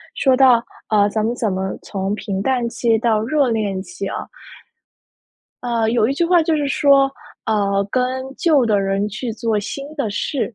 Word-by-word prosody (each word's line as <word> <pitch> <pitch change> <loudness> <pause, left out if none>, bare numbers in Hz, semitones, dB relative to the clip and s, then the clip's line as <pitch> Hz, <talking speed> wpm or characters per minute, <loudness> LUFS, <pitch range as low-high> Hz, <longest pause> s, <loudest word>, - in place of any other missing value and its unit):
说 265 -2 +3
到， 255 -3 +5 0.3
呃， 205 -1 +3
咱 215 +1 -1
们 230 - 0
怎 225 -5 -1
么 190 0 -3
从 195 0 -3
平 195 -2 -4
淡 250 +1 0
期 230 -1 +1
到 220 -1 +1
热 285 +3 +1
恋 205 -4 -1
期 180 +1 -7
啊 - - -5 1.4
呃， 235 -2 0
有 230 -2 +2
一 - - +1
句 340 - +1
话 345 0 +4
就 315 0 +1
是 295 -1 -1
说， 275 -1 +4 0.3
呃， 200 -2 0
跟 255 - +1 0.3
旧 300 -6 +3
的 210 -3 +2
人 195 +1 0
去 230 +4 -5
做 220 -1 -1
新 275 +7 -6
的 280 -7 -2
事， 245 +3 -2
225 Hz, 195 characters per minute, -19 LUFS, 205-265 Hz, 1.4 s, 到